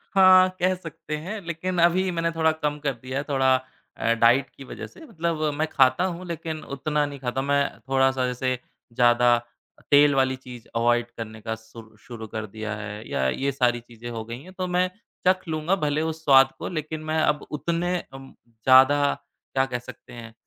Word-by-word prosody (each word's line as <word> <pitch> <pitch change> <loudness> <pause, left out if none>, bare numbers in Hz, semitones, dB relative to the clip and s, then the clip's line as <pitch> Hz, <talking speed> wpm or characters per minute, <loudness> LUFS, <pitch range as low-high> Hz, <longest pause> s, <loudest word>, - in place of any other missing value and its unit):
हाँ, 185 -1 +7
कह 185 +1 +3
सकते 165 -3 -7
हैं 195 +8 -5
लेकिन 175 +2 -3
अभी 180 +2 +3
मैंने 165 0 -1
थोड़ा 160 -1 +2
कम 150 -2 -2
कर 140 -2 -1
दिया 130 +3 -6
है 140 - -1
थोड़ा 130 -1 +3 0.4
अ, 115 - +2
डाइट 120 +4 +3
की 135 - -13
वजह - - -8
से, 325 - -15
मतलब 170 - -3 0.2
मैं 155 +1 0
खाता 130 +4 +4
हूँ 180 +1 -9
लेकिन 160 -1 -5
उतना 150 +2 0
नहीं 140 -1 -7
खाता। 130 +1 -2
मैं 140 +1 +2 0.3
थोड़ा-सा 130 -1 +2
जैसे 130 +1 -1 0.4
ज़्यादा 120 0 +4 0.6
तेल 145 0 +6
वाली 130 0 +2
चीज़ 125 -2 -11
अवॉइड 120 0 +2
करने 110 -1 -7
का 110 +1 -3
सु 115 +1 -13 0.2
शुरू 115 -2 -8
कर 110 0 -5
दिया 110 0 -4
है, 105 +1 -7
या 65 - 0
ये 140 - -1
सारी 120 -2 +1
चीज़ें 120 0 -11
हो 115 -2 -5
गई 115 +2 -7
हैं, 185 +1 -13
तो 185 -1 -3
मैं 180 0 +3 0.4
चख 185 -1 +2
लूँगा 160 +4 0
भले 150 +1 0
उस 160 0 -11
स्वाद 135 -1 +6
को, - - -4
लेकिन 155 -2 -4
मैं 160 - +1
अब 150 -1 +1
उतने 175 +3 -1 0.2
अम, 135 0 -11
ज़्यादा 130 +5 +5 0.5
क्या 135 0 +2
कह 125 -2 -4
सकते 120 - -13
हैं 115 -1 -10
135 Hz, 195 wpm, -25 LUFS, 120-160 Hz, 0.6 s, हाँ